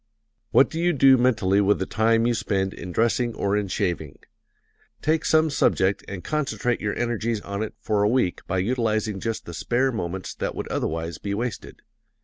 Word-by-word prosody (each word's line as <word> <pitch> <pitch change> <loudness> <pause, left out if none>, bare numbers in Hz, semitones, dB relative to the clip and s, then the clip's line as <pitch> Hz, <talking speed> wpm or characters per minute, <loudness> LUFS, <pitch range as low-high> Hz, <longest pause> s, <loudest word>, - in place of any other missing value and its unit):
What 135 - +5
do 160 - -4
you 175 +1 +2
do 135 -2 +6
mentally 110 -6 +2
with 100 +1 +3
the 95 - -2
time 115 +2 +2
you 120 - +2
spend 100 -4 -1
in 90 +1 -7
dressing 115 +3 +1
or 100 0 0
in 105 -1 0
shaving? 90 -7 -2 0.9
Take 155 +1 +1
some 160 -1 +3
subject 95 -7 +2
and 95 -3 -6
concentrate 140 -5 -1
your 105 -1 -2
energies 115 -2 -1
on 100 +1 -5
it 110 - -4
for 105 -2 0
a 105 - +3
week 120 -7 +1
by 95 - -1
utilizing 110 -1 0
just 115 +2 -3
the 85 - -8
spare 125 - 0
moments 95 -4 -4
that - - -4
would - - -4
otherwise 80 0 -3
be 100 -1 -3
wasted. 115 0 -5
110 Hz, 185 wpm, -24 LUFS, 95-120 Hz, 0.9 s, do